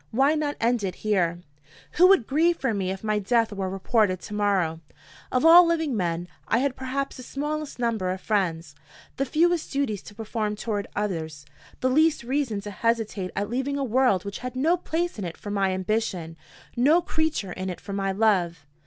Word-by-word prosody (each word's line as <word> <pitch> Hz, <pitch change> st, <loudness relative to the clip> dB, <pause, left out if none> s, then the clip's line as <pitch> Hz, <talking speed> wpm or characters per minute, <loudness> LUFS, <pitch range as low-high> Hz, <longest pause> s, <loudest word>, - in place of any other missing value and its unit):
Why 270 Hz, +6 st, +3 dB
not 300 Hz, -2 st, -1 dB
end 235 Hz, -1 st, +1 dB
it 185 Hz, -2 st, -2 dB
here?" 175 Hz, -5 st, +1 dB, 0.6 s
Who 360 Hz, +2 st, +8 dB
would 385 Hz, -, +5 dB
grieve 325 Hz, +6 st, +2 dB
for 260 Hz, -4 st, -1 dB
me 195 Hz, -3 st, -1 dB
if 190 Hz, +2 st, -5 dB
my 215 Hz, -1 st, +1 dB
death 225 Hz, +1 st, +1 dB
were 195 Hz, -2 st, -3 dB
reported 195 Hz, 0 st, +1 dB
to 210 Hz, -, -8 dB
morrow? 195 Hz, -6 st, +1 dB, 0.5 s
Of 255 Hz, +4 st, +1 dB
all 340 Hz, +2 st, +10 dB
living 325 Hz, -6 st, 0 dB
men, 175 Hz, -3 st, -1 dB, 0.2 s
I 225 Hz, -, +2 dB
had 265 Hz, +1 st, 0 dB
perhaps 265 Hz, +1 st, -3 dB
the -, -, -8 dB
smallest 295 Hz, +3 st, -4 dB
number 230 Hz, -6 st, -1 dB
of 185 Hz, +1 st, -2 dB
friends, 175 Hz, -7 st, -1 dB, 0.4 s
the 275 Hz, -, 0 dB
fewest 335 Hz, +3 st, +1 dB
duties 270 Hz, -8 st, -1 dB
to 205 Hz, -, -13 dB
perform 215 Hz, -1 st, -3 dB
toward 205 Hz, -2 st, -3 dB
others, 160 Hz, -8 st, -3 dB, 0.4 s
the 255 Hz, -, +2 dB
least 310 Hz, 0 st, +3 dB
reason 250 Hz, -5 st, -1 dB
to 205 Hz, +1 st, -7 dB
hesitate 220 Hz, -3 st, -1 dB
at 200 Hz, +1 st, -1 dB
leaving 265 Hz, +3 st, -1 dB
a 280 Hz, -, -1 dB
world 245 Hz, -6 st, +2 dB
which 200 Hz, 0 st, -5 dB
had 250 Hz, 0 st, -6 dB
no 310 Hz, +7 st, +3 dB
place 345 Hz, -4 st, -3 dB
in -, -, -3 dB
it 170 Hz, -2 st, -5 dB
for 205 Hz, -, -7 dB
my 195 Hz, -1 st, +1 dB
ambition, 185 Hz, -3 st, -2 dB, 0.4 s
no 300 Hz, +8 st, +4 dB
creature 315 Hz, -, -1 dB
in 185 Hz, +1 st, -4 dB
it 180 Hz, -, -6 dB
for 200 Hz, -, -8 dB
my 195 Hz, 0 st, -1 dB
love. 185 Hz, -7 st, +1 dB
220 Hz, 195 wpm, -25 LUFS, 190-275 Hz, 0.6 s, all